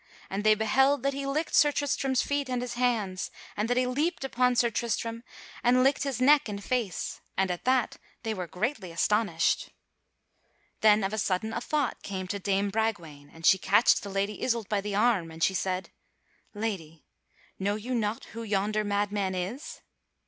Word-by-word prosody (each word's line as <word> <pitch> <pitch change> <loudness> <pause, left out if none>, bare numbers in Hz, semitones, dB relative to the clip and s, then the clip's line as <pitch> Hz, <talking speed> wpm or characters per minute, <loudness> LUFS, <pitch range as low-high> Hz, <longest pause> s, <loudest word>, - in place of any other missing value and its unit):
And 195 +2 -2
they 215 0 +6
beheld 265 +5 +2
that 275 0 +1
he 275 0 -4
licked 305 +4 -1
Sir 295 - +6
Tristram's 275 -3 0
feet 285 -2 -1
and 250 -1 -1
his 245 -1 -4
hands, 225 -7 0 0.3
and 210 +3 -1
that 245 - +1
he 255 - +3
leaped 290 +6 -1
upon 250 -1 +2
Sir 235 -1 +3
Tristram 230 +1 -2 0.4
and 250 +1 +4
licked 270 +1 +3
his 275 -4 -2
neck 280 -1 +5
and 200 -1 -5
face, 230 -9 -2 0.2
and 190 -1 +2
at 175 - -5
that 255 -2 +2 0.3
they 225 - -1
were 180 -4 -5
greatly 190 - -3
astonished. 180 -1 +1 1.1
Then 215 -1 +5
of 195 +2 -1
a 215 - -1
sudden 205 +4 -1
a 235 - -2
thought 290 -1 -1
came 190 -2 -5
to 200 - -2
dame 200 +1 0
Bragwaine, 175 -10 -3
and 165 0 -9
she 190 - +6
catched 205 +6 +4
the 200 - -7
Lady 195 +1 -2
Isoult 230 -4 0
by 205 -2 0
the 205 0 -3
arm 210 -6 +2
and 160 0 -5
she 190 - +3
said: 185 +1 -2 0.6
"Lady, 180 -8 -4 0.5
know 200 +2 0
you 230 +4 -4
not 220 -2 -1
who 230 - -6
yonder 210 0 0
madman 205 -2 -1
is?" 195 - -5
215 Hz, 185 wpm, -28 LUFS, 195-250 Hz, 1.1 s, they